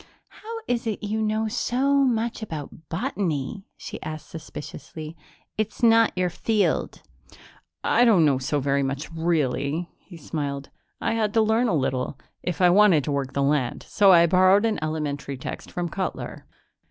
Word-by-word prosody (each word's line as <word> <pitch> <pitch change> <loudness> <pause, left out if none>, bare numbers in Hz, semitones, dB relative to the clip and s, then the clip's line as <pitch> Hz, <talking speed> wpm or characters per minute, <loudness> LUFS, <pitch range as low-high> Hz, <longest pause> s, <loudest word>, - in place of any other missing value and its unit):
"How 435 - -14 0.2
is 240 -1 -1
it 215 -1 -3
you 215 +1 -1
know 215 +1 0
so 255 +5 +1
much 235 -4 +1
about 160 -5 -7
botany?" 190 - -2
she - - -8
asked 155 -1 -7
suspiciously. 155 0 -8 0.4
"It's 215 +3 -3
not 230 -1 +6
your 180 -1 +1
field." 210 +3 0 0.8
"I 245 - +4
don't 205 -9 +5
know 140 -3 +3
so 140 +3 -1
very 140 0 +1
much, 140 +4 -3
really," 160 -1 -1
he 175 - -13
smiled. 140 -3 -4 0.3
"I 225 - 0
had 215 -2 0
to 225 - +5
learn 220 +3 +2
a 190 - +1
little, 130 -1 -1 0.2
if 180 -3 -3
I 180 - +7
wanted 190 -6 +5
to 150 - -2
work 140 -2 -2
the 140 - +1
land, 140 -3 0
so 200 -2 +5
I 170 -2 +7
borrowed 185 +4 +5
an 220 -2 0
elementary 150 -3 -3
text 125 - -7
from 175 -1 -3
Cutler." 185 +3 -5
175 Hz, 165 wpm, -25 LUFS, 145-220 Hz, 0.8 s, I